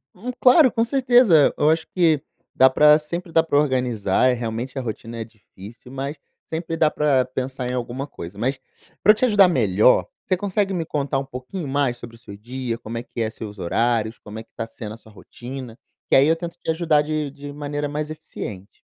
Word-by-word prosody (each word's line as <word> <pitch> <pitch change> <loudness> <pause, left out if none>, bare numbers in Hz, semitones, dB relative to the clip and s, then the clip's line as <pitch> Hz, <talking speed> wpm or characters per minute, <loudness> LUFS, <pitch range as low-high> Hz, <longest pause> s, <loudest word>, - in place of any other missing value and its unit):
Hum, 230 +7 -5
claro, 260 +2 +7
com 230 - +2
certeza, 240 - +4
eu 150 - +3
acho 160 0 +1
que 160 -5 +3 0.3
dá 130 - +6
pra 150 +3 +6
sempre 170 +3 -6
dá 165 - +5
pra 160 -3 0
organizar, 125 -7 +1
é - - +3
realmente 120 +2 -4
a - - -1
rotina 115 0 -6
é - - -2
difícil, 110 +1 -14
mas 135 +3 -5 0.3
sempre 165 0 -3
dá 155 -2 +3
pra 140 -4 +2
pensar 130 0 -4
em - - -3
alguma 125 +2 -3
coisa, 100 -9 -10
mas 130 +5 -1 0.4
para 210 - +7
te 215 - -4
eu - - +6
ajudar 205 -4 +6
melhor, 110 - +3 0.2
você 185 - +2
consegue 195 +1 -1
me 170 -3 -2
contar 140 -3 -2
um 135 - -2
pouquinho 135 +7 -7
mais 135 -2 0
sobre 120 -1 -11
o - - -23
seu 100 -4 -11
dia, 120 +2 -5
como 115 0 -7
é 115 - -4
que 120 - -6
é 110 - 0
seus 105 -1 -9
horários, 110 +4 0
como 105 +1 -10
é - - -8
que - - -38
tá 115 - -4
sendo 110 -1 -8
a - - -15
sua 110 -1 -19
rotina, 125 +3 -9 0.3
que - - +4
aí 135 +2 +5
eu 165 - +4
tento 170 0 -7
te - - -6
ajudar 160 -2 +2
de 155 -1 -2
de 145 +1 -9
maneira 145 0 -3
mais 150 +1 -4
eficiente. 105 -10 -8
135 Hz, 220 wpm, -22 LUFS, 115-160 Hz, 0.4 s, claro